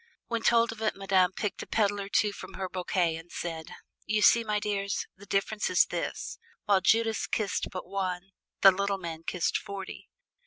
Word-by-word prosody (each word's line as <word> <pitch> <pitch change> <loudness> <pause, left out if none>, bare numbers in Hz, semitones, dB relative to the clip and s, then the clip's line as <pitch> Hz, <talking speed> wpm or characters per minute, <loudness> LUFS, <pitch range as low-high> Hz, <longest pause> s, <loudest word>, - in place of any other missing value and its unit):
When 230 -1 -2
told 230 0 +4
of 225 -1 -9
it 215 - 0
Madame 190 -2 +3
picked 200 +2 -3
a - - -8
petal 205 -2 +1
or 195 - -6
two 210 0 +2
from - - -9
her 190 -1 -3
bouquet 180 -2 0
and 165 +1 -12
said, 165 -2 -5 0.4
"You 210 0 +1
see, 235 - +6
my 210 -1 0
dears, 200 -1 -2
the 200 +2 -15
difference 210 +2 0
is - - +5
this: - - -4 0.3
while 200 -2 +4
Judas 225 +2 +2
kissed 205 -4 -1
but 185 - -6
one, 185 -1 -3 0.3
the 195 - +10
Little 200 +1 -1
Man 165 -3 -6
kissed 170 +1 0
forty." 195 -1 -8
195 Hz, 190 wpm, -29 LUFS, 185-210 Hz, 0.4 s, the